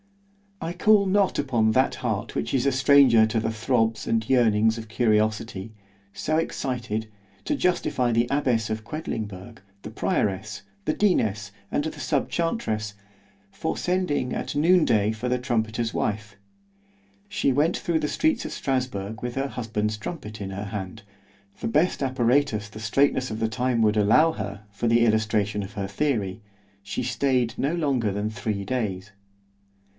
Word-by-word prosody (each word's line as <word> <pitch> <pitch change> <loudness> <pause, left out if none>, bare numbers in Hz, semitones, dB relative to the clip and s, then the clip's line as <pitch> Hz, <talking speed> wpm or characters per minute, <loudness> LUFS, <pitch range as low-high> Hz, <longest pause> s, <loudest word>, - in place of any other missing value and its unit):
I 165 +1 -4
call 205 +3 +4
not 195 0 +2
upon 120 -6 +2
that 130 +4 +2
heart 110 -3 -3
which - - -2
is 130 - +1
a 140 - +3
stranger 130 -4 +6
to 110 +1 0
the 110 0 -1
throbs 115 0 0
and 110 -1 0
yearnings 110 -3 +3
of 110 -1 -7
curiosity, 110 -2 0 0.4
so 155 +1 -1
excited, 120 -8 -2 0.4
to 300 - 0
justify 175 - +1
the 115 +1 +2
abbess 125 -6 +1
of 110 0 -3
Quedlingberg, 110 - -6 0.2
the - - -6
prioress, 105 +1 -1 0.2
the 155 - +1
deaness, 105 - +1 0.2
and 155 +2 -1
sub 145 -4 -1
chantress, 110 - -1 0.6
for 160 - -3
sending 180 -8 0
at - - -4
noon 170 +3 +4
day 105 0 +2
for 110 +3 -3
the 125 - +2
trumpeter's 115 -2 -1
wife: 105 -1 -2 0.9
she 205 -9 +1
went 150 +6 +2
through 165 -2 0
the 150 - -1
streets 310 - +1
of - - -5
Strasburg 110 -6 -2
with 125 0 -3
her 135 +1 -1
husband's 110 -4 -2
trumpet 105 -3 -7
in 95 - -4
her 100 +2 -5
hand,——the 100 0 -9
best 150 +10 +1
apparatus 125 -4 +1
the 110 - -10
straitness 130 +4 +1
of 110 - -4
the 110 - 0
time 125 0 0
would 105 0 +3
allow 115 +11 +5
her, 100 -4 -6
for 105 +3 -2
the 115 +1 +4
illustration 105 -2 +1
of 95 - -9
her 100 -1 -3
theory—she 100 -4 -4
staid 125 -1 +1
no 140 +4 0
longer 135 -10 0
than 105 +2 -2
three 105 -2 -3
days. 105 -3 -3
115 Hz, 155 wpm, -25 LUFS, 105-140 Hz, 0.9 s, stranger